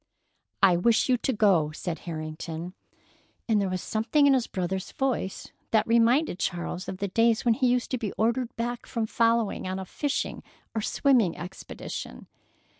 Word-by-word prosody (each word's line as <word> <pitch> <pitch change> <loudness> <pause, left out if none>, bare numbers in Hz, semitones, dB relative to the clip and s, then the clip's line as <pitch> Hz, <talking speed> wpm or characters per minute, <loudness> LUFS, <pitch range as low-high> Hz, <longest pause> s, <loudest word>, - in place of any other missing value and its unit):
"I 180 -3 +6
wish 225 +8 +3
you 250 - +4
to 265 - -1
go," 195 -9 +3
said 165 +2 -5
Harrington, 160 +2 -5 0.7
and 215 -3 +3
there 195 - 0
was 185 -1 -3
something 225 +7 +2
in 280 - +6
his 255 -3 +1
brother's 185 0 -3
voice 260 -8 -2 0.2
that 215 -1 +3
reminded 235 - +3
Charles 175 +1 -3
of 185 - -5
the 200 - -2
days 230 +4 +2
when 235 - +5
he 255 +2 +1
used 245 0 +1
to 255 - -1
be 215 -5 -3
ordered 235 +2 0
back 240 +1 -3
from 230 -3 -1
following 230 -3 +1
on 185 0 -2
a 190 - -5
fishing 285 +9 -2 0.3
or 220 - -1
swimming 240 - +2
expedition. 180 +2 -7
220 Hz, 170 wpm, -27 LUFS, 185-240 Hz, 0.7 s, I